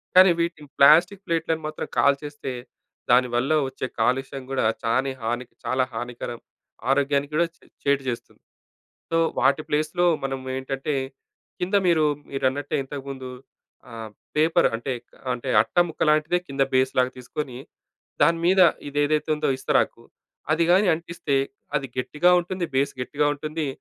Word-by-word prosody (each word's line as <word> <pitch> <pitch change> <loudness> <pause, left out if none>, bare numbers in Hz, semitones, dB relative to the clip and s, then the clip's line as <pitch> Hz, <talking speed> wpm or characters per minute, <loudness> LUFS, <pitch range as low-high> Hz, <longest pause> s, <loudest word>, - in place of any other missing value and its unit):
కానీ 185 +1 +9
వీటిని 170 -4 -3
ప్లాస్టిక్ 175 +7 +6
ప్లేట్లను 165 -1 -1
మాత్రం 155 - -5
కాల్చేస్తే, 140 0 +1 0.6
దానివల్ల 125 +2 +3 0.2
వచ్చే 130 - -4
కాలుష్యం 135 +1 0
కూడా 135 - 0 0.2
చాని 130 +4 +1
హాని 120 +3 -2 0.2
చాలా 130 0 +1
హానికరం. 120 0 -5 0.5
ఆరోగ్యానికి 140 +1 +1
కూడా 170 +2 +3
చే - - -28 0.2
చేటు 140 -1 +2
చేస్తుంది. 120 - -7 0.7
సో, 165 - +1 0.2
వాటి 140 +3 +3
ప్లేస్‌లో 155 +4 +1 0.2
మనం 135 0 -2 0.2
ఏంటంటే 135 +2 -3 0.7
కింద 185 +3 +1
మీరు 160 -3 +4 0.2
మీరన్నట్టే 135 +1 -1
ఇంతకుందు 135 -1 -7 0.6
ఆహ్, 115 -1 -7 0.3
పేపర్ 160 +3 +4
అంటే 120 +4 -2 0.4
అంటే 125 +2 -5
అట్ట - - -17
ముక్క 160 - -5
లాంటిదే 155 +3 +3
కింద 140 0 0
బేస్ 130 0 +3
లాగా 125 0 +3
తీసుకొని, 125 0 -5 0.7
దాని 165 0 +4
మీద 190 +2 +4 0.3
ఇది 145 +1 -3
ఏదైతే 150 +1 0
ఉందో 150 - -1
ఇస్తరాకు, - - 0 0.5
అది 160 +2 +2
గాని 190 +4 +5
అంటిస్తే 170 -3 -3 0.4
అది 140 -1 -1
గట్టిగా 150 +7 +2
ఉంటుంది. 180 +1 -4
బేస్ 140 +1 +2
గట్టిగా 145 +4 0
ఉంటుంది. 155 +1 -4
140 Hz, 135 wpm, -24 LUFS, 130-160 Hz, 0.7 s, కానీ